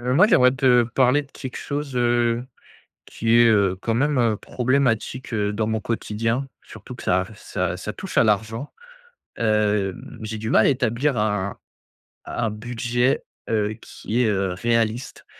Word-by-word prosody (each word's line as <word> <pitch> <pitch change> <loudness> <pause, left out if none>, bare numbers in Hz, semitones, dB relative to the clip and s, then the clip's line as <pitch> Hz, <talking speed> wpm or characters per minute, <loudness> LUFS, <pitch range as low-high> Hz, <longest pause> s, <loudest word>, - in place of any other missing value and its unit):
Heu, 125 +1 -1
moi, 180 +8 +6
j'aimerais 125 - +5
te 125 -2 +4
parler 130 +4 +2
de 140 - -19
quelque 130 -2 -8
chose, 145 -2 -4
heu, 120 0 +1 0.6
qui 115 +1 +1
est, 120 - +7
heu, 100 -4 +3
quand 115 +1 -1
même, 145 +2 +1
heu, 115 -3 +2
problématique, 130 0 -1
heu, 105 -2 0
dans 110 +1 -1
mon 110 0 -1
quotidien. 115 +3 -2 0.2
Surtout 125 - -11
que - - -10
ça 90 0 +1
ça - - -3
ça - - -5
touche - - -4
à - - +6
l'argent. 110 +5 -1 0.7
Hem, 105 -3 0
j'ai 110 0 -5
du 110 +1 -4
mal 110 - +5
à - - +5
établir 130 +1 0
un 105 -2 -1 0.7
un 115 -2 -2
budget, 120 +4 -1 0.3
heu, 105 -1 0
qui 115 +4 -3
est, 120 - +3
heu, 100 -3 0
réaliste. 115 +4 -1
115 Hz, 165 wpm, -23 LUFS, 105-125 Hz, 0.7 s, est